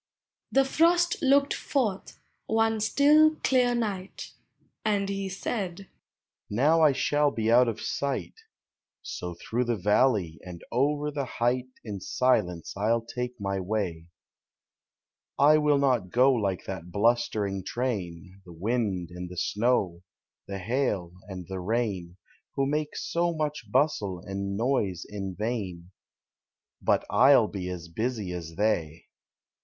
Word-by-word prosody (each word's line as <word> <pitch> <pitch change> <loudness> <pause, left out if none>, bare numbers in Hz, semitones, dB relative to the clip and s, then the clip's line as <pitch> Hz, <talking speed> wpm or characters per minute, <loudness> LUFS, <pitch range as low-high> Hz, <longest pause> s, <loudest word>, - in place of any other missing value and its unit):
The 270 0 +4
Frost 345 +5 +3
looked 280 0 +4
forth, 220 -9 -2 0.3
one 225 0 +2
still, 300 +7 +5
clear 250 -2 +3
night. 200 -5 -4 0.5
And 205 -2 +1
he 195 -1 -3
said, 190 -1 -4 0.3
" - - -66 0.2
Now 145 +10 +3
I 155 -2 +6
shall 145 +2 +2
be 110 -3 -1
out 125 +1 +6
of 115 -2 -2
sight; 140 -1 -3 0.7
So 90 -1 -6
through 120 +8 -2
the 120 0 0
valley 105 - +2
and 90 -2 -9
over 145 +4 +1
the 140 -2 -2
height 125 +1 0 0.2
In 105 -4 -5
silence 95 -11 0
I 100 +2 -1
'11 115 0 +1
take 125 0 -4
mv 100 -2 -2
wav. 90 -5 -2 1.3
I 150 +2 +6
will 150 -1 +3
not 125 -9 +1
go 130 +6 +4
like 100 -6 -1
that 90 -2 -6
blustering 105 -2 +1
train, 95 -6 -4
The 90 - -12
wind 95 -2 -1
and 90 0 -7
the 90 - -10
snow, 100 -4 0 0.5
the 100 - -4
hail 100 -4 -1
and 95 -3 -7
the 95 0 -5
rain, 95 -4 -2 0.4
Who 135 - +1
make 150 +2 -2
so 170 0 -1
much 150 -8 -3
bustle 125 - +1
and 100 +2 -4
noise 110 -7 0
in 95 -3 -5
vain, 95 -5 -4 0.9
Hut - - +2
1 - - 0
'11 115 -5 +4
be 90 -2 -4
as 85 -2 -6
busy 110 +2 -3
as 85 -2 -6
they! 85 -6 -1
115 Hz, 140 wpm, -27 LUFS, 95-150 Hz, 1.3 s, I